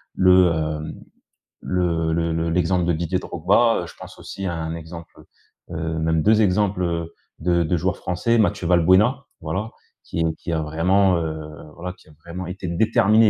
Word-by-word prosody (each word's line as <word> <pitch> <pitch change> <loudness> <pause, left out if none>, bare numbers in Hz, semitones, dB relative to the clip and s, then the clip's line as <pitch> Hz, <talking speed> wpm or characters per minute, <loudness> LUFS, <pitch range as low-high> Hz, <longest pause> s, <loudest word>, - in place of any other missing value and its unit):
le 90 -1 +5
hem, 80 -1 -3 0.7
le 85 -3 0
le 85 0 0
le 80 +1 -1
l'exemple 90 +1 +1
de 85 - +1
Didier 85 +3 -1
Drogba, 100 +8 +2
heu, - - -5
je - - -12
pense - - -11
aussi 95 - -7
à 90 - -1
un 80 0 -4
exemple, 85 +1 -10 0.5
heu, - - -5
heu, 80 0 -2
même 80 0 +1
2 110 +1 +4
exemples, 100 -1 +1
heu, 85 -1 -2 0.3
de 85 +1 +2
de 85 +2 0
joueurs 90 +3 -1
français 105 +7 0
Mathieu 105 -5 +1
Valbuena, 95 +10 +4 0.2
voilà. 105 +4 -3 0.3
Qui 85 - -2
qui 85 - -4
a 80 - 0
vraiment, 90 +5 +2
heu, 80 -2 -3 0.4
voilà 90 +2 -5
qui - - -23
a 80 - -18
vraiment 85 +1 -6
été 90 +1 -6
déterminé. 110 +4 +4
85 Hz, 180 wpm, -22 LUFS, 80-95 Hz, 0.7 s, le